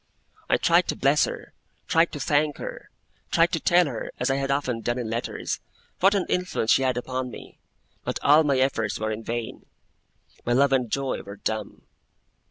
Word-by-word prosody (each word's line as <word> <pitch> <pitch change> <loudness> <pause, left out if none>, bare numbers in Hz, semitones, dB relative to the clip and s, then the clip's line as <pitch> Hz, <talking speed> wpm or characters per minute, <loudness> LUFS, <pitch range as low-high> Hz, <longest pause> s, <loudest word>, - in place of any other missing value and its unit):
I - - +4
tried - - +3
to - - -1
bless - - +3
her, - - -8 0.3
tried 165 0 +3
to 145 - -5
thank 145 +1 +1
her, - - -7 0.4
tried 170 0 +3
to 165 - 0
tell 175 +3 +4
her 125 -7 -5
(as 125 +2 +1
I 135 - +1
had 135 0 -2
often 135 -4 -1
done 120 +2 -1
in 115 -3 -3
letters) 115 +1 -3 0.4
what 195 +3 +4
an 195 - +1
influence 180 -11 0
she - - +5
had 130 -2 +1
upon 130 +1 -3
me; - - -12 0.4
but - - -2
all 150 +3 +6
my 140 -3 +2
efforts 120 -5 0
were 110 0 -1
in 110 +1 -4
vain. 115 0 -5 0.8
My 120 - 0
love 140 +2 +4
and 125 -3 +1
joy 135 +3 -2
were 100 +1 -10
dumb. 110 0 -4
135 Hz, 190 wpm, -25 LUFS, 120-150 Hz, 0.8 s, all